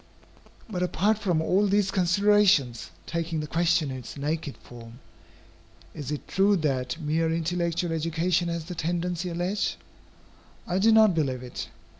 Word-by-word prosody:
But 185 -5 -4
apart 200 +4 +1
from 175 -6 0
all 195 +5 +2
these 200 0 +2
considerations, 185 - +3 0.2
taking 165 -1 -2
the 150 - -3
question 165 -2 +1
in 130 - -5
its 125 +2 -9
naked 150 +1 -3
form, 115 -1 -12 1.0
is 145 -3 -6
it 150 - -5
true 200 +2 +3
that 135 -4 -1
mere 160 +1 0
intellectual 170 +1 -1
education 165 +2 0
has 170 -1 -3
the 180 - -6
tendency 175 +1 -2
alleged? 175 +4 -1 0.9
I 180 +2 -1
do 220 +3 +5
not 220 -3 +6
believe 135 -6 -1
it. 125 - -6
170 Hz, 145 wpm, -26 LUFS, 155-185 Hz, 1.0 s, not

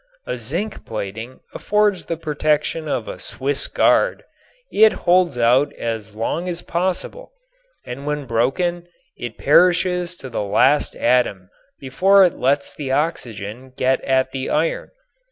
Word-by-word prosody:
A - - -3
zinc 170 - -4
plating 110 +4 -6
affords 210 -3 0
the 165 - -2
protection 155 0 -1
of 125 -6 -2
a - - -7
Swiss 140 +1 -3
Guard, - - +2 0.5
it 220 +1 +5
holds 175 -6 +3
out 125 +5 +3
as 110 -2 -5
long 165 +11 -2
as 175 -1 -4
possible 185 - -3 0.5
and 135 +4 -7
when 150 -1 -2
broken 170 +10 -1 0.3
it 120 -2 -7
perishes 180 +2 +3
to 135 - -9
the 120 - -3
last 135 +8 +2
atom 100 -7 +1 0.3
before 190 +9 +4
it 175 - 0
lets 140 +2 0
the 140 -3 -5
oxygen 130 -5 -3
get 130 +1 +1
at 130 0 +1
the 130 -1 -4
iron. 160 +2 -1
145 Hz, 135 wpm, -20 LUFS, 125-175 Hz, 0.5 s, it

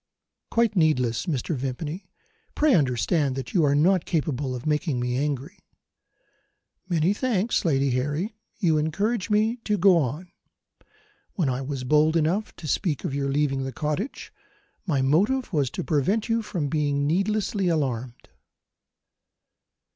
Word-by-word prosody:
"Quite 230 -2 +2
needless, 150 -5 +1
Mr. 150 0 -1
Vimpany. 145 +8 -4 0.5
Pray 300 -2 +3
understand 140 - +1
that 135 -3 -6
you 175 - +3
are 140 -1 +3
not 180 +4 +3
capable 145 -5 -1
of 125 - -7
making 150 -3 0
me 125 0 -1
angry." 145 +6 -3 1.3
"Many 170 +2 +2
thanks, 230 -2 0
Lady 140 -4 +2
Harry: 145 - -1 0.2
you 165 -7 +2
encourage 200 +8 -1
me 215 +3 +2
to 210 -3 -1
go 190 -1 +5
on. 155 +6 -3 1.0
When 165 -8 0
I 130 +1 -2
was 135 -1 -4
bold 155 +4 +3
enough 175 +7 0
to 160 - -8
speak 150 -1 -1
of - - -3
your 140 0 -1
leaving 135 -1 0
the 135 - -4
cottage, 155 - -4 0.5
my 140 -6 +1
motive 205 - +1
was 145 -5 +1
to - - -5
prevent 180 +9 0
you 230 0 +1
from 175 -8 -3
being 145 -1 0
needlessly 195 +4 0
alarmed." 130 -7 -2
155 Hz, 140 wpm, -25 LUFS, 135-190 Hz, 1.3 s, go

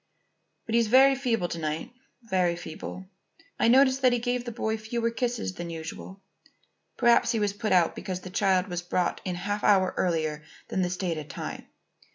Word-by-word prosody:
But 225 - -5
he's 235 -1 +3
very 265 +4 +6
feeble 240 -9 0
to 170 - -4
night, 155 +8 -3 0.3
very 185 -5 +1
feeble. 175 +2 -8 0.5
I - - +3
noticed 260 +2 +5
that 255 -1 +5
he 245 - +2
gave 245 +1 -2
the 240 - -4
boy 220 -1 -2
fewer 230 +1 -2
kisses 235 -4 -2
than 175 -1 -6
usual. 165 +4 -8 0.7
Perhaps 240 0 +4
he 225 - 0
was 205 -1 0
put 215 +1 -3
out 175 -3 +3
because 185 -1 -5
the 185 - -9
child 190 -2 +2
was 175 -2 -3
brought 175 0 -1
in 180 -2 -2
a - - -6
half 205 +3 -3
hour 190 -2 +4
earlier 155 -4 0 0.3
than 190 - -1
the 180 - 0
stated 170 -5 -3
time. - - -6
195 Hz, 190 wpm, -27 LUFS, 175-235 Hz, 0.7 s, very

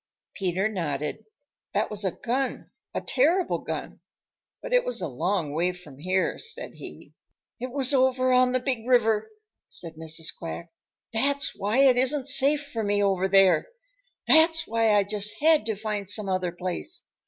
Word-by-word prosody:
Peter 190 +1 -1
nodded. 155 -2 -4 0.5
"That 210 +2 0
was 210 -1 -2
a 190 - +1
gun, 260 +3 -3 0.2
a - - -3
terrible 335 +8 +1
gun, - - -6 0.6
but - - -6
it - - +4
was - - -2
a - - -3
long 160 +3 -2
way 175 +4 0
from 150 -7 -14
here," 185 +3 0
said 455 0 -2
he. - - -11 0.5
"It 255 +2 -4
was 270 +1 +1
over 255 -1 +3
on 250 0 +4
the 255 - +1
Big 250 -3 -3
River," 225 -4 +2 0.4
said 165 -3 -5
Mrs. 160 0 -1
Quack. 170 0 -7 0.4
"That's 280 +5 0
why 210 +7 +1
it 260 -2 +5
isn't 265 +2 +3
safe 285 +1 +3
for 225 -1 -3
me 205 0 +1
over 190 -1 +1
there. 195 - +4 0.6
That's 320 0 +5
why 225 -1 +2
I 205 - +4
just 205 +1 -3
had 310 -6 +3
to 220 - -1
find 205 -2 -4
some 205 0 0
other 185 -2 -1
place. 185 - -4
215 Hz, 165 wpm, -26 LUFS, 185-260 Hz, 0.6 s, it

